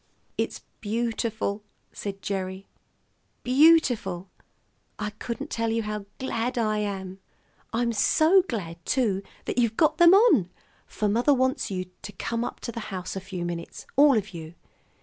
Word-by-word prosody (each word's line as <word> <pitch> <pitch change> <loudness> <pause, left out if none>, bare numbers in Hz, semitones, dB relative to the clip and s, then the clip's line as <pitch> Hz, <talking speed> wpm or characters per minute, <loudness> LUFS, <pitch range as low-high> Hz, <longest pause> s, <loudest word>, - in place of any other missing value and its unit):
"It's - - -3 0.2
beautiful," 220 -1 -2 0.3
said 195 -2 -6
Gerry, 190 -1 -3 0.8
"beautiful! 255 - +3 0.7
I 210 0 -3
couldn't 235 +7 -6
tell 230 0 0
how 210 -1 -4
glad 245 -1 -2
I 215 -2 +1
am. 195 -2 -4 0.5
I'm 235 +1 0
so 315 - +5
glad, 170 -7 -5
too, 215 -7 +1 0.2
that - - -1
you've 235 -2 +1
got 310 0 +3
them 345 +2 +8
on, 400 - +5 0.4
for 210 - -2
mother 240 +7 +3
wants 260 0 0
you 185 -2 -3 0.2
to - - -7
come 230 +4 -2
up - - -5
to - - -4
the 230 - -6
house 185 -2 -5
a 190 - -4
few 185 -2 -5
minutes, 170 -1 -6
all 280 -3 +6
of 205 -1 -3
you. 165 0 -8
215 Hz, 150 wpm, -26 LUFS, 195-245 Hz, 0.8 s, them